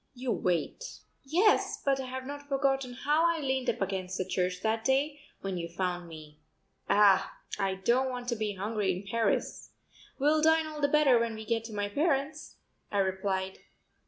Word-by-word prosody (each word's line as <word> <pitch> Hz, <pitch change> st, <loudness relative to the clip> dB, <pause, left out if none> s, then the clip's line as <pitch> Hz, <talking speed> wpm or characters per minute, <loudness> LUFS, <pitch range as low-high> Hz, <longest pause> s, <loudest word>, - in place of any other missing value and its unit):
You 250 Hz, 0 st, -2 dB
wait." 180 Hz, -, -2 dB, 0.3 s
"Yes, 355 Hz, +10 st, +2 dB
but 275 Hz, -1 st, +2 dB
I 265 Hz, -, -4 dB
have 260 Hz, 0 st, -5 dB
not 285 Hz, +1 st, -8 dB
forgotten 270 Hz, -2 st, 0 dB
how 295 Hz, +5 st, +1 dB
I 335 Hz, -1 st, +1 dB
leaned 265 Hz, -3 st, -1 dB
up -, -, -2 dB
against 190 Hz, -1 st, -3 dB
the 185 Hz, -, -1 dB
church 180 Hz, -1 st, -1 dB
that 220 Hz, 0 st, 0 dB
day 280 Hz, +4 st, +1 dB, 0.2 s
when 190 Hz, -2 st, -3 dB
you 170 Hz, 0 st, -4 dB
found 175 Hz, 0 st, -3 dB
me. 155 Hz, -2 st, -12 dB, 0.5 s
Ah, 200 Hz, -2 st, +4 dB, 0.2 s
I 195 Hz, -1 st, 0 dB
don't 240 Hz, +7 st, +2 dB
want 245 Hz, -1 st, -5 dB
to 235 Hz, -, 0 dB
be 215 Hz, -2 st, -2 dB
hungry 205 Hz, 0 st, -1 dB
in 185 Hz, +2 st, -5 dB
Paris." 225 Hz, +3 st, -1 dB, 0.5 s
"We'll 300 Hz, +3 st, +3 dB
dine 320 Hz, 0 st, +4 dB
all 305 Hz, -1 st, -6 dB
the 285 Hz, -, +4 dB
better 285 Hz, -4 st, +5 dB
when 230 Hz, -1 st, -1 dB
we 220 Hz, 0 st, -8 dB
get 225 Hz, 0 st, 0 dB
to 225 Hz, -, -8 dB
my 205 Hz, -1 st, -1 dB
parents'," 290 Hz, +4 st, -1 dB, 0.4 s
I 205 Hz, -, -1 dB
replied. 190 Hz, 0 st, -1 dB
230 Hz, 185 wpm, -30 LUFS, 190-275 Hz, 0.5 s, better